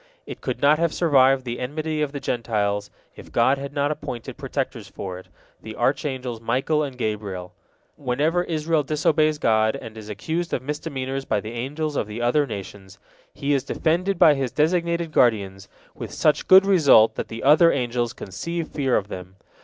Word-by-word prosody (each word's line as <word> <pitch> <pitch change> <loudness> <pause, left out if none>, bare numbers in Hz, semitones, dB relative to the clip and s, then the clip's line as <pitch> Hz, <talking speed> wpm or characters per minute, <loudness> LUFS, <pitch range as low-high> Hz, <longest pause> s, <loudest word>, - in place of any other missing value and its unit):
It - - -9
could - - -4
not 150 +2 +5
have 170 -1 0
survived 135 -5 +4
the 120 0 -4
enmity 155 +4 -3
of 150 -2 -1
the 140 - -5
Gentiles, 105 -5 -1 0.3
if - - -13
God 130 +4 +3
had 140 0 -6
not 145 0 0
appointed 120 -6 -6
protectors - - -4
for 90 -2 -7
it, 95 - -15 0.3
the 110 0 -8
archangels 130 -2 -2
Michael 130 +7 0
and 135 -4 -4
Gabriel. 105 -6 -4 0.4
Whenever 150 +6 0
Israel 160 -1 0
disobeys 155 +1 +1
God, 110 -4 +2
and 110 - -9
is 110 -1 -10
accused 160 - -3
of 130 - -5
misdemeanors 135 -2 -4
by 105 - 0
the 110 +2 -7
angels 145 +6 -3
of 105 - -1
the 105 +2 -6
other 130 +5 +2
nations, 95 -3 -8 0.4
he 145 0 -1
is 135 -2 +1
defended 175 +6 0
by 155 - +7
his 135 -3 -2
designated 170 +1 0
guardians, 100 -7 +1 0.3
with - - -8
such 150 - +1
good 190 +1 +8
result 150 - +5
that - - -5
the 115 0 -7
other 155 +5 +6
angels 120 -2 -1
conceive 165 - -5
fear 135 -4 +1
of 100 - -3
them. 90 -1 -9
135 Hz, 175 wpm, -23 LUFS, 110-155 Hz, 0.4 s, good